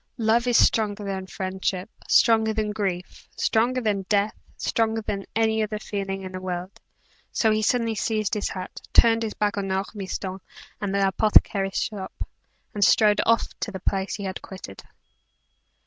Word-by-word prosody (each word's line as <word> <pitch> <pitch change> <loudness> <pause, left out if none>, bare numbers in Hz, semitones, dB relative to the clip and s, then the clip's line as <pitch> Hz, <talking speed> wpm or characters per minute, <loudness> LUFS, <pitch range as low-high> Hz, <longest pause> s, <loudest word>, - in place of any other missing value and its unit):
Love 230 +1 +2
is 245 - +4
stronger 210 -2 +3
than 190 -1 -4
friendship, 190 -1 -3 0.2
stronger 220 -1 +5
than 215 -1 0
grief, 190 -4 -4
stronger 240 +3 +2
than 210 -5 0
death, 205 0 +2 0.2
stronger 225 -1 0
than 200 -2 -4
every 220 0 +2
other 215 0 -2
feeling 195 -2 -4
in 185 - -6
the 185 0 -6
world; 180 0 -5 0.5
so 220 - +2
he 215 0 +2
suddenly 230 +1 +1
seized 215 0 -1
his 210 - -1
hat, 185 -1 -7
turned 230 -1 +6
his 220 -2 -3
back 210 0 0
on 195 -1 -3
Ormiston 190 -1 -3 0.4
and 200 -1 -1
the 200 -1 +3
apothecary's 195 -1 +3
shop, 200 -3 -4 0.5
and 205 - +1
strode 210 +2 +5
off 230 0 +3
to - - -2
the 190 - -6
place 195 +1 -1
he 205 - -6
had 190 -1 -4
quitted. 185 - -9
205 Hz, 165 wpm, -25 LUFS, 190-220 Hz, 0.5 s, turned